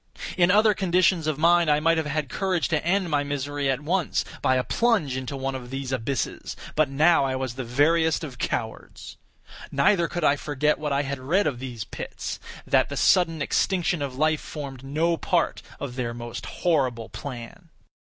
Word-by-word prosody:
In 175 -1 +4
other 210 +2 +5
conditions 180 -3 +2
of 155 -3 0
mind 170 +1 +4
I 150 0 +4
might 165 +2 +3
have 155 - -2
had 150 0 -1
courage 185 +5 -1
to 160 -3 0
end 180 0 +1
my 145 -1 +2
misery 145 0 -2
at 135 +1 0
once 170 +2 0 0.2
by 130 - +3
a 130 - +1
plunge 205 - +1
into 130 +1 -4
one 135 0 -2
of 125 -2 -7
these 135 0 -4
abysses; 130 +1 -3 0.2
but 155 -2 +3
now 155 +3 +4
I 135 -1 0
was 130 -2 -3
the 130 +1 -5
veriest 160 +7 +2
of 130 -5 -8
cowards. 110 -2 -4 0.5
Neither 170 +5 +3
could 175 +1 -4
I 145 -1 +4
forget 150 +1 0
what 150 -1 -3
I 140 +1 +1
had 140 -1 -4
read 165 +10 +1
of 140 -5 -1
these 125 -4 -5
pits—that - - -3
the - - -5
sudden 165 -5 +3
extinction 175 0 +1
of 135 -3 -3
life 155 +2 +1
formed 135 -4 -7
no 160 +5 0
part - - 0 0.2
of 130 -3 -5
their 120 -2 -3
most 120 -1 -7
horrible 130 -9 0
plan. 135 +6 -8
145 Hz, 185 wpm, -25 LUFS, 130-170 Hz, 0.5 s, other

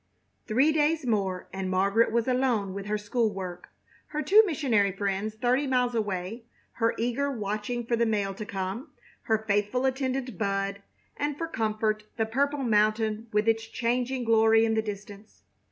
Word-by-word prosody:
Three 260 +8 +4
days 310 -1 +1
more 195 -6 -1
and 190 -1 -3
Margaret 200 +5 +2
was 235 +1 +1
alone 250 -7 +1
with 200 +1 -6
her 210 0 0
school 215 +2 0
work, 185 -3 -7 0.4
her 305 0 -3
two 420 +3 +7
missionary 240 - +2
friends 200 +2 -2
thirty 250 +5 +1
miles 250 -2 +1
away, 210 +1 -3 0.3
her 230 -1 0
eager 245 +5 0
watching 215 0 -3
for 235 - +1
the 235 0 +1
mail 205 -3 0
to 205 - -6
come, 200 - -4 0.4
her 220 -1 0
faithful 210 +5 +1
attendant 260 -4 -2
Bud, 200 -1 -1 0.4
and 290 0 -2
for 330 - -3
comfort 215 -5 -1
the 225 - +1
purple 280 +5 0
mountain 215 0 +1
with 210 +1 +1
its 225 0 +2
changing 245 +2 -1
glory 225 0 +5
in 225 - +1
the 220 - +2
distance. 205 0 -9
225 Hz, 165 wpm, -27 LUFS, 205-250 Hz, 0.4 s, two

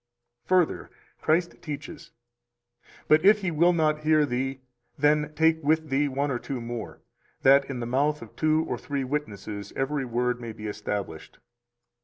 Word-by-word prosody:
279 180 -3 +2 0.3
Further, - - -31
Christ 170 +2 +1
teaches: 150 -2 -7 1.0
But 155 +1 +5
if 210 +2 +6
he 190 -3 -1
will 170 +3 +4
not 155 -3 +1
hear 155 0 +3
thee, 135 +1 -3 0.4
then 150 +1 +2
take 160 +1 +3
with 155 +1 +1
thee 140 +2 +2
one 140 +1 -1
or 120 - -1
two 135 0 -5
more, 115 -1 -6 0.4
that 140 +1 +6
in 130 -3 -4
the - - -3
mouth 145 +5 0
of - - -14
two 155 0 +2
or - - -3
three 140 -2 -3
witnesses 105 -7 -5
every 135 0 -1
word 125 0 -1
may 115 -2 -6
be 110 0 -9
established. 105 -5 -5
145 Hz, 165 wpm, -26 LUFS, 125-155 Hz, 1.0 s, if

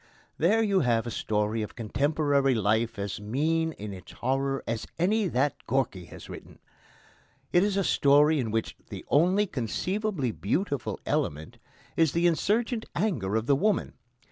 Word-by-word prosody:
There 210 +8 +3
you 200 -3 +2
have 120 -5 +1
a 120 - -4
story 105 +1 -1
of 105 - -6
contemporary 140 +3 +1
life 110 +2 +1
as 100 0 -4
mean 160 +9 0
in 105 -5 -7
its 95 -1 -11
horror 135 +2 -1
as 115 -1 -3
any 205 +4 +2
that 140 -1 +1
Gorky 115 -8 -1
has - - -12
written. - - -11 1.0
It 175 - +5
is 200 -1 0
a 195 - +2
story 145 0 +4
in 120 -4 -1
which 110 +1 -2
the - - -8
only 185 +7 +3
conceivably 180 - -2
beautiful 140 - -2
element 75 +2 -2 0.4
is 160 -3 +3
the 170 +1 +1
insurgent 220 +7 +1
anger 135 - -1
of 110 0 0
the 140 - +4
woman. 205 +7 0
140 Hz, 155 wpm, -27 LUFS, 110-175 Hz, 1.0 s, It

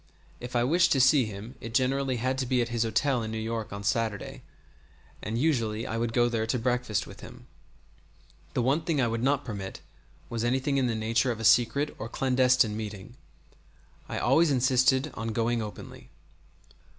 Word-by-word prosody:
If 125 +1 -8
I 120 - +3
wished 170 +7 +3
to 135 - +1
see 130 0 +5
him 110 +3 -8
it 115 0 -7
generally 135 +1 +1
had 130 +3 -1
to 130 - -1
be 125 0 +1
at 120 -1 0
his 120 -1 -2
hotel 120 +3 +1
in 110 - -4
New 110 - -4
York 110 0 -4
on 100 0 -6
Saturday, 105 0 -2 0.8
and 110 +2 -3
usually 115 -6 0
I 115 - -3
would 115 0 -1
go 120 0 +3
there 115 -2 -1
to 125 - 0
breakfast 125 -3 -1
with - - -12
him. - - -12 1.1
The 125 - +1
one 140 +6 +2
thing 160 -2 -1
I 125 - +2
would 115 0 -2
not 140 +2 +1
permit 100 -4 -6 0.5
was 115 -1 -3
anything 130 +3 0
in 130 -2 +2
the 115 - -1
nature 115 +3 +1
of 115 - -5
a - - -5
secret 120 +6 +3
or 115 - -5
clandestine 125 -4 +2
meeting. 105 +1 -7 0.9
I - - -3
always 165 0 +3
insisted 130 +1 +2
on 115 0 -4
going 115 +1 0
openly. 105 -1 -9
120 Hz, 185 wpm, -28 LUFS, 110-130 Hz, 1.1 s, see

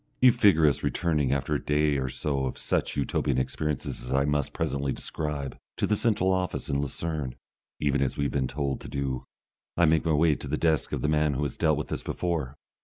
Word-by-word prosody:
You 125 -1 +8
figure 100 -9 +5
us 75 - +3
returning 75 -6 +1
after 70 -1 0
a - - -1
day 75 -1 +2
or 65 -1 -1
so 70 0 -1
of - - -5
such - - -1
Utopian 70 -1 0
experiences 65 -1 -2
as 60 - -6
I 70 +1 +3
must 75 -1 0
presently 70 -1 -1
describe, 75 +1 -4 0.2
to - - +1
the 105 - +2
central 100 -4 +2
office 95 -1 -1
in 70 0 +1
Lucerne, 75 -2 -3 0.4
even 70 -1 +1
as 70 - 0
we 70 - 0
have 70 - -1
been 65 -2 +1
told 70 -1 -2
to - - -8
do. 65 -2 -3 0.5
I 85 - +5
make 80 0 +3
my 80 - +1
way 80 +1 +4
to 70 - -6
the 75 +3 -1
desk 80 -2 +1
of - - -2
the - - +2
man 75 -2 +2
who 70 - -1
has 70 - -2
dealt 80 -3 +2
with 75 - -4
us - - -2
before. 80 -7 -2
75 Hz, 225 wpm, -27 LUFS, 70-80 Hz, 0.5 s, You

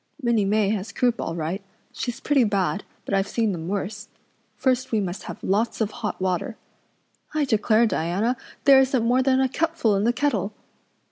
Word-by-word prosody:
"Minnie 235 -6 +2
May 205 0 +2
has 210 0 -2
croup 245 -2 +1
all 165 - -3
right; 170 +4 -3 0.3
she's 245 +1 -4
pretty 280 -2 +3
bad, 200 -2 0 0.2
but - - -4
I've 195 0 +2
seen 225 0 0
them 165 -3 -5
worse. 205 +2 -3 0.5
First 255 -1 0
we 220 - +2
must 190 -2 -3
have - - -8
lots 215 +5 0
of 215 -2 0
hot 230 -4 -4
water. 185 +5 -1 0.8
I 300 -2 +2
declare, 220 -1 +3
Diana, 205 +5 0 0.3
there 275 -2 +8
isn't 260 -3 +2
more 250 +2 +3
than 260 0 +3
a 265 - +3
cupful 310 -6 +1
in 195 - +1
the 235 - +3
kettle! 225 -7 -1
220 Hz, 185 wpm, -24 LUFS, 195-255 Hz, 0.8 s, there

